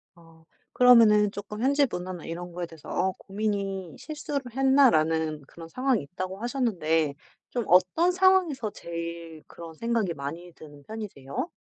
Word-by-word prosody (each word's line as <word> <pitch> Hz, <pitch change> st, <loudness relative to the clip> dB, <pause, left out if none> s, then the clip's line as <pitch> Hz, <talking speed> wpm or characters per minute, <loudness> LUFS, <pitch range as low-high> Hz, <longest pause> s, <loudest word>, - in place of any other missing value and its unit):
어 165 Hz, -1 st, -20 dB, 0.3 s
그러면은 225 Hz, -4 st, +6 dB
쪼끔 210 Hz, +2 st, -7 dB
현지 280 Hz, +2 st, +3 dB
문화나 180 Hz, -1 st, -6 dB
이런 175 Hz, +1 st, -6 dB
거에 175 Hz, 0 st, -4 dB
대해서 165 Hz, -2 st, -14 dB
어 190 Hz, +1 st, 0 dB
고민이 195 Hz, -4 st, -3 dB
"'실수를 295 Hz, -2 st, -4 dB, 0.2 s
했나?'라는 160 Hz, -, +3 dB
그런 165 Hz, +2 st, -12 dB
상황이 255 Hz, +3 st, 0 dB
있다."고 185 Hz, +6 st, -6 dB
하셨는데 170 Hz, -, 0 dB, 0.4 s
좀 240 Hz, -2 st, -2 dB
어떤 185 Hz, -, +4 dB
상황에서 365 Hz, -, +3 dB
제일 170 Hz, -2 st, -7 dB
그런 165 Hz, -1 st, -11 dB
생각이 225 Hz, -2 st, -1 dB
많이 165 Hz, +5 st, -7 dB
드는 145 Hz, -2 st, -14 dB
편이세요? 210 Hz, -, -6 dB
185 Hz, 330 characters per minute, -27 LUFS, 165-240 Hz, 0.4 s, 그러면은